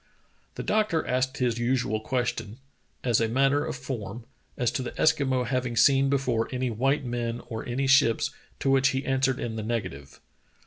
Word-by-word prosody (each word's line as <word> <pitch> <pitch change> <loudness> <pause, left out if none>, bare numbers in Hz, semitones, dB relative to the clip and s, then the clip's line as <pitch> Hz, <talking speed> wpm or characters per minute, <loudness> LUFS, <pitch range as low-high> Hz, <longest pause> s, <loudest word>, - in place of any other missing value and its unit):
The - - -5
doctor 210 -6 +1
asked 130 +1 0
his 120 -2 0
usual 120 -3 0
question, 115 -2 -2 0.5
as 120 -3 +2
a 115 - +2
matter 135 +4 +2
of - - -4
form, 120 -4 -6 0.3
as 120 -1 +1
to 135 - -2
the 125 - -5
Eskimo 135 -5 +2
having 125 0 -1
seen 135 +1 +5
before 125 -5 0
any 125 -1 -1
white 135 +5 0
men 120 -1 -2
or 110 -1 -4
any 130 +3 -1
ships, 130 -4 +4 0.3
to 135 - +2
which 135 0 +4
he 135 0 -1
answered 135 -1 +1
in 110 -2 -4
the - - -2
negative. 95 -12 -4
125 Hz, 175 wpm, -27 LUFS, 115-135 Hz, 0.5 s, seen